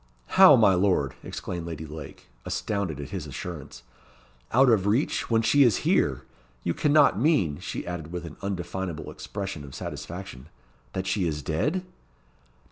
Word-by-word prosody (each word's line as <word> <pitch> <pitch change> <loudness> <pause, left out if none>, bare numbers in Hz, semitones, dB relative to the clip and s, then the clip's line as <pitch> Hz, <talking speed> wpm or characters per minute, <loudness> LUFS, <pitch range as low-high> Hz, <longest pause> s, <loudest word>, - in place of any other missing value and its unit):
"How, - - +8
my 95 - +5
lord!" 90 -8 +2
exclaimed 85 -2 -5
Lady 80 -1 -6
Lake, 75 -2 -9 0.2
astounded 100 -9 -2
at 70 - -6
his - - -4
assurance. 75 -8 -7 0.7
"Out 130 +3 +5
of 105 -5 +3
reach, 115 +9 +1
when 115 -1 +3
she 145 +5 +4
is 120 -7 +4
here! - - +2 0.4
You 85 - 0
cannot 145 - +4
mean," 120 - +2
she 90 - -5
added, 85 -2 -5
with 90 -1 -5
an 80 - -9
undefinable 95 -3 -4
expression 95 -7 -6
of 70 -2 -10
satisfaction, 65 +3 -7 0.5
"that 95 0 -3
she 95 -1 0
is 75 -3 -3
dead?" 150 - -1
90 Hz, 150 wpm, -26 LUFS, 80-105 Hz, 0.7 s, How